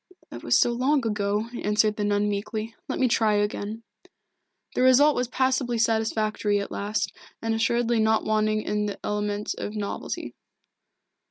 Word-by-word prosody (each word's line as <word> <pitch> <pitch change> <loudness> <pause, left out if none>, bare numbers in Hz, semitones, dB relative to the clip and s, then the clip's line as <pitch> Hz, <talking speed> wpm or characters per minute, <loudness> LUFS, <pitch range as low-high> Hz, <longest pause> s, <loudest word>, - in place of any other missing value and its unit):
"That - - -8
was - - +3
so 240 - +3
long 260 +2 +1
ago," 210 0 0
answered 210 0 +2
the 210 - -2
nun 205 0 +1
meekly. 215 +2 -3
"Let - - -3
me 260 - +3
try 220 -3 +2
again." 205 +2 -2 0.9
The - - 0
result 265 +4 +6
was 250 - 0
passably 255 -1 0
satisfactory 220 -2 +1
at 200 - -5
last, 205 +2 -2 0.3
and 225 0 -1
assuredly 235 +1 +1
not 220 0 +2
wanting 215 0 +1
in 210 0 -1
the 205 - -4
element 210 0 -2
of 210 - -5
novelty. 205 -1 -4
215 Hz, 155 wpm, -25 LUFS, 210-235 Hz, 0.9 s, result